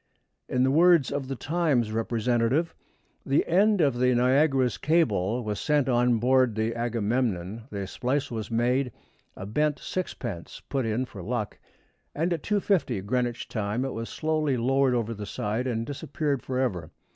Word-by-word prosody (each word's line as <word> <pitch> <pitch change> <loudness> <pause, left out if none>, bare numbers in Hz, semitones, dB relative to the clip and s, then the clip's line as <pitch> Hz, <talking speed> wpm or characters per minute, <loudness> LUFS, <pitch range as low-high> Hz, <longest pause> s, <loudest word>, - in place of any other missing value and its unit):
In 125 0 +2
the 130 - +3
words 170 -1 +5
of 140 -2 -3
The 135 - -3
Times 145 -5 0
representative: 120 +6 0 0.5
The 135 - +2
end 200 +3 +3
of 135 -5 +2
the 125 0 +3
Niagara's 130 0 +3
cable 120 - +1
was 105 -2 -3
sent 150 -3 +1
on 120 -1 +3
board 125 0 +3
the 110 +1 0
Agamemnon, 115 -3 -1
the 100 -2 -4
splice 130 +8 -2
was 110 -3 -4
made, 125 +3 +1 0.4
a 95 - -7
bent 150 +8 0
sixpence 120 - -5
put 135 -4 -1
in 115 +4 0
for 100 -6 -10
luck, 110 +2 -3 0.6
and 170 +4 0
at 165 - -3
2.50 185 - 0
Greenwich 120 +1 -1
time 110 +3 -2
it 135 - -3
was 115 0 -5
slowly 155 -4 0
lowered 130 +2 +2
over 115 -1 -1
the 105 -2 -7
side 110 +5 -2
and 115 -2 -1
disappeared 145 -1 -2
forever. 125 -12 -2
125 Hz, 155 wpm, -27 LUFS, 115-140 Hz, 0.6 s, words